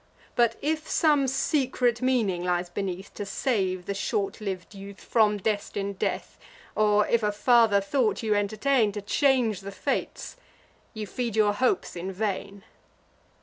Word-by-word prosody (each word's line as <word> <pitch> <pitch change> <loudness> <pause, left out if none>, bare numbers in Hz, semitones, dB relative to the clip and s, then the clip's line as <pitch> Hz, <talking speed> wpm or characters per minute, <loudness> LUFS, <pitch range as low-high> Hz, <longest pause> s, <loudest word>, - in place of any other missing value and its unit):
But, 235 -1 +3
if 310 +1 -1
some 295 -4 +3
secret 260 -3 +1
meaning 225 -9 +1
lies 175 0 -1
beneath, 190 0 -4
To 205 - -5
save 195 -4 -1
the 200 - -2
short 200 +1 -2
liv'd 190 -1 -5
youth 200 0 -10
from 215 -3 +2
destin'd 200 -1 -3
death, - - -3 0.4
Or 210 -1 +3
if 235 - +2
a 210 -1 +1
farther 225 -1 +4
thought 225 +2 0
you 215 -1 +2
entertain, 215 +3 +1
To 205 - -4
change 245 -3 +2
the 200 +1 -7
fates; 190 - -3 0.6
you 215 -1 -4
feed 235 +1 -3
your 210 -2 +3
hopes 255 - 0
in 180 +2 -4
vain." 200 0 -4
210 Hz, 145 wpm, -26 LUFS, 195-240 Hz, 0.6 s, farther